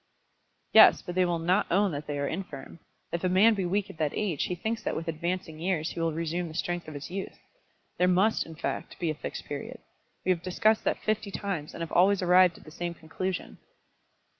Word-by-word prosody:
"Yes; - - +8
but 175 - -5
they 185 0 +3
will 175 -1 0
not 180 +5 +2
own 195 +2 +3
that 145 0 -5
they 145 -1 -3
are 140 - -1
infirm. 165 -3 -6 0.3
If 170 - -3
a 185 - +2
man 200 +5 +6
be 195 -3 -1
weak 200 +2 0
at 195 -5 -12
that 150 -2 0
age, 185 -9 -1
he 180 - -2
thinks 220 +5 -3
that - - -2
with 165 - -4
advancing 165 0 -3
years 165 -2 -1
he - - -6
will 165 0 +1
resume 170 +2 -2
the 160 - -9
strength 175 -1 -2
of 155 - -8
his 145 +4 -7
youth. 195 +1 -5 0.6
There 180 - +4
must, 190 +5 +3
in 160 - -9
fact, 165 - -4
be 170 -3 -1
a - - -2
Fixed 150 - -6
Period. - - -6 0.5
We 185 - +4
have 175 -2 0
discussed 215 +5 +2
that - - +1
fifty 215 -1 -1
times, 195 -7 -4
and - - -7
have 165 - -4
always 195 +2 +4
arrived 180 -1 +5
at - - -16
the 155 - -13
same 175 +1 -4
conclusion." 180 +4 -5
175 Hz, 225 wpm, -28 LUFS, 165-190 Hz, 0.6 s, Yes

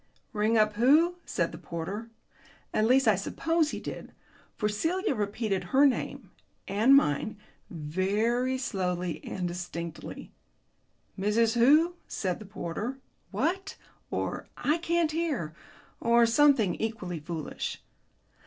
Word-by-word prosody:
"Ring 215 +2 +2
up 215 -1 +3
who?" 310 +9 +4
said - - 0
the - - -9
porter. 195 +7 -5 0.6
At 215 - +2
least 260 +1 +4
I 215 - +7
suppose 320 - 0
he - - -4
did, - - -7 0.4
for 210 - +1
Celia 325 - 0
repeated 205 -2 -2
her 275 +2 +4
name 265 -4 -1 0.4
(and 220 +8 +5
mine) 210 - +2 0.3
very 205 +11 0
slowly 180 - -2
and 180 -2 -3
distinctly. 170 -1 -6 0.9
"Mrs. 220 +3 +2
who?" 295 +9 +5
said 185 -3 -2
the 210 - -10
porter, 205 +6 -4 0.3
"What?" 340 - -1 0.3
or - - -3
"I 305 +4 +1
can't 340 -1 +1
hear," 305 - -2 0.5
or 235 0 +4
something 235 -5 +4
equally 205 -7 -4
foolish. 155 0 -5
220 Hz, 120 wpm, -28 LUFS, 185-275 Hz, 0.9 s, I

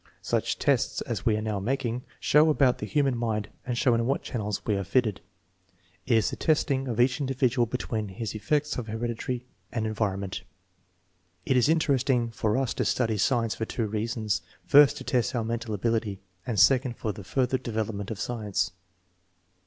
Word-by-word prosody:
"Such - - 0
tests - - +1
as - - -3
we 110 -2 +3
are 110 - -3
now 105 -2 -1
making 125 +2 -1 0.2
show 150 +2 +5
about 135 -4 +3
the 105 - -4
human 140 0 +1
mind 110 -3 -2 0.2
and 120 -2 -1
show 125 -1 +3
in 115 0 +1
what 135 - 0
channels 105 -4 -3
we 105 - +1
are 100 - -1
fitted. 110 0 +1 0.9
It 120 -3 +4
is 110 - +1
the - - -4
testing 140 -4 +1
of 120 -2 -3
each 125 +2 +3
individual 130 -3 +1
between 110 -3 -3
his 105 +2 -5
effects 150 +6 0
of 115 - -5
inheritancy 120 +2 -3 0.3
and 110 -2 -2
environment." 100 -3 -2 0.5
" 90 +1 -42
It 130 - +2
is 125 0 +4
very 160 - +5
interesting 135 -6 +1
for 110 0 0
us 135 -2 0
to - - -1
study 115 -4 +1
science 115 -1 +2
for 110 - -3
two 115 +1 -2
reasons; 110 0 -1 0.2
first, 145 0 +7
to - - -7
test 125 0 0
our 115 - 0
mental 115 0 -3
ability, 110 -1 -1 0.3
and 115 -5 0
second 125 +2 +4
for 110 - -2
the 105 0 -9
further 130 +5 0
develop 110 -3 -2
ment 100 -1 -5
of 110 -4 -5
science." 105 -5 -1
115 Hz, 190 wpm, -27 LUFS, 105-130 Hz, 0.9 s, first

